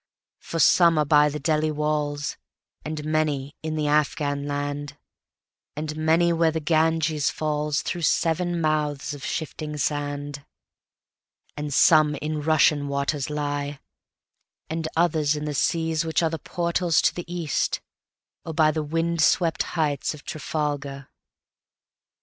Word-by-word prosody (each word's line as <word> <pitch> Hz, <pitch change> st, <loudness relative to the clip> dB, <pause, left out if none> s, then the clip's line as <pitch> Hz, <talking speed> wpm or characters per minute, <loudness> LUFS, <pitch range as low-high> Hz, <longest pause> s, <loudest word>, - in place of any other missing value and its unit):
For 165 Hz, -, -6 dB
some 170 Hz, 0 st, +5 dB
are 150 Hz, -, +3 dB
by 150 Hz, 0 st, +5 dB
the 150 Hz, +1 st, -5 dB
Delhi 155 Hz, +1 st, +1 dB
walls, 150 Hz, -1 st, -1 dB, 0.5 s
And 155 Hz, -1 st, -5 dB
many 150 Hz, -3 st, -1 dB
in 155 Hz, 0 st, -3 dB
the 155 Hz, -1 st, -1 dB
Afghan 145 Hz, -1 st, 0 dB
land, 145 Hz, 0 st, -4 dB, 0.8 s
And 150 Hz, 0 st, -4 dB
many 165 Hz, +2 st, +3 dB
where 165 Hz, 0 st, +3 dB
the 160 Hz, 0 st, -2 dB
Ganges 160 Hz, -1 st, +1 dB
fallsThrough 150 Hz, +3 st, -2 dB
seven 170 Hz, +2 st, +1 dB
mouths 150 Hz, -2 st, -1 dB
of 145 Hz, -1 st, -9 dB
shifting 155 Hz, -1 st, -4 dB
sand. 145 Hz, -1 st, -3 dB, 1.1 s
And 150 Hz, 0 st, -4 dB
some 155 Hz, +1 st, +5 dB
in 150 Hz, +1 st, -3 dB
Russian 150 Hz, -1 st, +3 dB
waters 140 Hz, 0 st, -1 dB
lie, 145 Hz, -1 st, -3 dB, 0.9 s
And 160 Hz, 0 st, -2 dB
others 155 Hz, -3 st, +2 dB
in 150 Hz, 0 st, -4 dB
the 150 Hz, -, -3 dB
seas 160 Hz, +2 st, 0 dB
which 160 Hz, 0 st, 0 dB
areThe 165 Hz, -1 st, -1 dB
portals 170 Hz, -1 st, +1 dB
to -, -, +3 dB
the 175 Hz, -1 st, -7 dB
East, 170 Hz, -5 st, -1 dB, 0.6 s
or 160 Hz, -, -6 dB
byThe 155 Hz, -1 st, +2 dB
wind 165 Hz, +1 st, 0 dB
swept 165 Hz, +1 st, +3 dB, 0.2 s
heights 150 Hz, -2 st, 0 dB
of 150 Hz, -, -14 dB
Trafalgar. 145 Hz, -2 st, -4 dB
150 Hz, 130 wpm, -24 LUFS, 145-160 Hz, 1.1 s, some